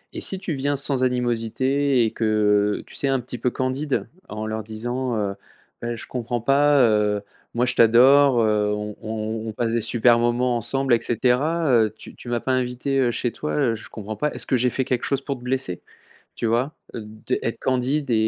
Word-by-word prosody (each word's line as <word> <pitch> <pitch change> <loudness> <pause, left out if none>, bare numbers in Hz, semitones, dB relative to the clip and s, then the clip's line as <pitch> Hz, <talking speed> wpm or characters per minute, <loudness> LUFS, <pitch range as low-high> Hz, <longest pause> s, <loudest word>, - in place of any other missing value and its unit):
et - - -4
si 190 - -1
tu 185 -3 -4
viens 145 +1 -1
sans 135 -1 +2
animosité 125 +2 +1
et 110 - -1
que, 105 -2 +2
heu, - - -18
tu - - -15
sais, 140 - 0
un 135 -1 +1
petit 125 0 -7
peu 125 - +1
candide 130 +3 -2 0.2
en 105 +1 -5
leur 110 0 -3
disant, 120 +3 -3
heu: 100 -2 -2 0.5
«Beh, 120 0 -3
je - - -8
comprends 120 -1 -3
pas, 140 +3 +4
heu, 105 -2 +2 0.3
moi 120 +1 +2
je 125 - -1
t'adore, 130 +3 +6
heu, 105 -1 +2
on 105 0 -4
on 110 - -7
on 110 0 -4
on - - -6
passe 115 +1 -1
des 115 - +1
super 115 +1 +3
moments 120 +1 +1
ensemble 130 +3 0
et 115 - +3
cetera. 135 +8 +1
Heu, 115 -3 +4
tu - - -9
tu 120 - -10
m'as 120 0 0
pas 130 - -1
invité, 130 +2 -1
heu, 125 -2 +3
chez 120 0 -2
toi, 150 +6 -4
heu, 130 -6 +1
je 110 - -11
comprends 110 0 -7
pas, 150 +6 -1
est-ce - - -3
que - - +1
j'ai 125 +1 +2
fait 130 - -1
quelque 125 -1 -1
chose 140 -1 0
pour 140 0 -3
te - - -15
blesser?» 125 -8 -2 0.5
Tu 115 - -2
vois? 120 +6 0 0.2
Heu, 115 - -4
de 110 +1 -4
être 115 0 -3
candide 130 +3 0
et - - +2
120 Hz, 225 wpm, -23 LUFS, 110-135 Hz, 0.5 s, t'adore